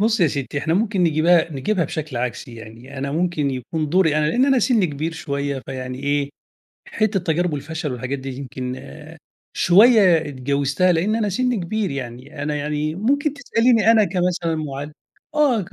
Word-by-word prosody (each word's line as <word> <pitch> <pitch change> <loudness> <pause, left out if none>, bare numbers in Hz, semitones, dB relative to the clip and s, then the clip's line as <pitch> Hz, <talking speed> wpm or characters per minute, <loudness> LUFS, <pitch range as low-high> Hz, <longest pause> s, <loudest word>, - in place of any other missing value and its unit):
بُصّي 220 -1 +2
يا 165 - +5
ستّي 140 0 -3
إحنا 160 +3 0
ممكن 205 0 0
نجيبها 165 +1 +3
نجيبها 165 +7 0
بشكل 155 -5 -5
عكسي 120 0 -4
يعني، 115 +4 -11
أنا 140 +1 -3
ممكن 160 -3 0
يكون 145 +4 -3
دوري 165 -3 +3
أنا 150 - +2
لإن 245 +11 +3
أنا 270 -2 +4
سنّي 230 -5 +3
كبير 155 +2 -3
شوية 140 -3 -3
فيعني 130 -1 -5
إيه، 145 0 -1 0.6
حتة 215 -2 0
تجارب 175 -1 0
والفشل 155 +1 -4
والحاجات 130 +3 -4
دي 135 0 -6
يمكن 130 -2 -5 0.8
شوية 200 -1 +6
إتجاوزتها، 140 +6 +1
لإن 180 +6 +1
أنا 220 -2 0
سنّي 250 +5 0
كبير 195 +1 -2
يعني. 135 +2 -7
أنا 150 0 -2
يعني 150 +1 -2
ممكن 280 - +1
تسأليني 230 -5 +3
أنا 220 -2 +5
كمثلًا 180 -3 -1
مُعلم، 145 -1 -5 0.4
آه، 280 -7 +3
ك 175 - -10
160 Hz, 170 wpm, -21 LUFS, 140-195 Hz, 0.8 s, شوية